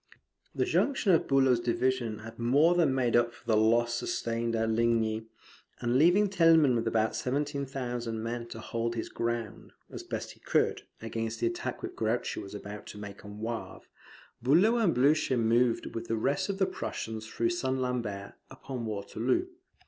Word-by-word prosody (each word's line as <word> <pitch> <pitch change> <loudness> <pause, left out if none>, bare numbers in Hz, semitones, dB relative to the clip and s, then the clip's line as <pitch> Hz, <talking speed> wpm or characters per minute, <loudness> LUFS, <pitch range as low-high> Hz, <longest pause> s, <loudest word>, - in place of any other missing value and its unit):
The - - +1
junction 270 -8 +2
of 165 - +3
Bulow's 135 -3 +4
division 120 -1 0
had 115 +1 -10
more 140 +9 +4
than 170 -6 +3
made 125 -3 +1
up 120 0 +2
for - - -20
the 110 - +2
loss 120 +2 +3
sustained 115 0 -2
at 110 0 +1
Ligny; 110 -1 +1 0.5
and 120 0 0
leaving 180 +7 +5
Thielman 165 -7 +5
with 115 -1 0
about 110 -1 +1
seventeen 140 +1 -2
thousand 120 -4 -4
men 115 +1 -4
to - - -8
hold 115 0 -3
his 115 - -4
ground, 115 -2 -4 0.2
as - - -6
he - - -16
best - - -6
could, - - +1 0.2
against 115 0 -3
the - - 0
attack 115 0 -3
which - - -5
Grouchy 115 +2 -1
was 100 +1 -8
about 105 0 -8
to - - -9
make 100 -1 -9
on 105 0 -9
Wavre, 110 -5 -5 0.6
Bulow 175 - +4
and 195 - +2
Blucher 135 0 +3
moved 115 +1 +2
with 115 0 -5
the 115 - -1
rest 140 - 0
of 195 - -2
the 190 - +3
Prussians 110 -10 -5
through 115 +1 0
St. 130 -7 -1
Lambert 115 -6 -3 0.2
upon 125 -4 -6
Waterloo. 110 - -1
120 Hz, 175 wpm, -29 LUFS, 110-130 Hz, 0.6 s, leaving